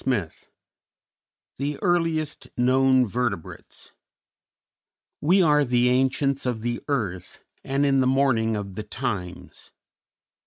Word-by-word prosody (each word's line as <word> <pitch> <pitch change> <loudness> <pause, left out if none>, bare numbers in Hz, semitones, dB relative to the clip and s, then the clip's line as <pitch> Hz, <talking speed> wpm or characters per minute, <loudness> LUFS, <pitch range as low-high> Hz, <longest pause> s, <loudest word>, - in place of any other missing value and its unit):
] - - -15
II 105 -11 0 1.3
THE 140 +2 -3
EARLIEST 165 -4 0
KNOWN 130 +1 +3
VERTEBRATES 115 -6 -5 1.3
"_We 180 +4 +4
are 150 -1 +4
the 125 -1 +2
ancients 135 +1 +1
of 120 -3 -2
the 120 +1 -3
earth 100 - -4 0.2
And 140 +1 0
in 135 -1 +3
the 130 - +2
morning 130 -5 +2
of 100 -2 -5
the 110 - -5
times. 105 -5 -6
130 Hz, 115 wpm, -24 LUFS, 110-140 Hz, 1.3 s, We